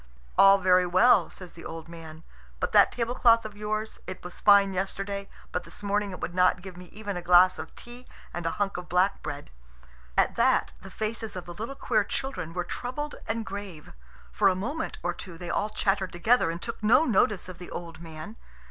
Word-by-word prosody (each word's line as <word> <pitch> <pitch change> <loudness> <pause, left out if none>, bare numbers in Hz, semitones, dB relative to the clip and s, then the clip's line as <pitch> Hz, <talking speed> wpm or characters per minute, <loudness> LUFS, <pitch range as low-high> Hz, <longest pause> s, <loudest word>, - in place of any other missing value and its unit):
"All 195 0 +8
very 185 -1 +4
well," 185 +8 +5
says 180 -2 -11
the 170 - -12
old 165 0 -7
man; 165 -1 -11 0.4
"but - - -1
that - - +6
tablecloth 235 -1 +3
of 215 -1 -7
yours 215 +1 -3
it 185 -1 -7
was 180 - -7
fine 200 -1 +6
yesterday, 195 +1 -3 0.2
but 180 - -2
this - - -11
morning 205 0 0
it 185 - -7
would 175 - -4
not 180 0 +3
give 190 -2 -9
me 180 +1 -11
even 205 +2 -6
a 175 - -4
glass 180 +1 +5
of - - -8
tea 240 +1 -12 0.3
and 175 -1 -3
a - - -3
hunk 200 -2 -1
of 180 0 -8
black 185 +3 +2
bread." 145 0 -6 0.7
At - - +3
that - - +3
the 195 - -10
faces 220 +2 -4
of 180 - -6
the 175 - -8
little 225 +9 -6
queer 220 -5 +1
children 265 -7 -4
were 180 - -1
troubled 255 +10 -5
and 225 0 -2
grave. 200 -7 -8 0.4
For - - +3
a 190 - +3
moment 285 - -4
or - - 0
two 175 -4 -10
they 175 0 -5
all 210 - 0
chattered 195 -3 0
together, 220 +3 +3
and 165 +1 -4
took 230 +4 -6
no 220 +9 +5
notice 210 - +2
of 180 -2 -10
the 180 - -9
old 165 -2 -7
man. 165 +7 -9
195 Hz, 210 wpm, -27 LUFS, 175-215 Hz, 0.7 s, All